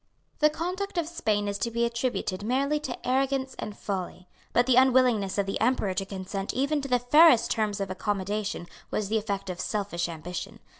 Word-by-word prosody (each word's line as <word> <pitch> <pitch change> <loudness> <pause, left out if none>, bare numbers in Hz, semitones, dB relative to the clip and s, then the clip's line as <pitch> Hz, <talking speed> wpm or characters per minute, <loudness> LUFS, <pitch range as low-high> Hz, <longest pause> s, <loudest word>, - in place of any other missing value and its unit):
The 300 - +5
conduct 360 +5 -4
of 335 -2 0
Spain 215 -12 0
is 200 0 -2
to 235 - 0
be 235 +1 0
attributed 235 -5 -2
merely 275 +7 +1
to 270 -4 -6
arrogance 265 +1 0
and 210 -1 -6
folly. 185 -2 -5 0.2
But 245 - +3
the 255 -1 +4
unwillingness 250 -6 +4
of 200 - +2
the 195 - -3
Emperor 225 -5 +2
to 195 +1 -2
consent 195 0 -4
even 280 +3 +1
to 275 - -5
the 250 -2 +3
fairest 250 +1 +6
terms 210 -2 0
of 195 -1 -3
accommodation 205 0 -2 0.2
was 210 -2 -2
the 220 0 +2
effect 200 -3 -3
of 180 - -5
selfish 200 -5 -2
ambition. 170 +2 -6
220 Hz, 190 wpm, -27 LUFS, 195-260 Hz, 0.2 s, fairest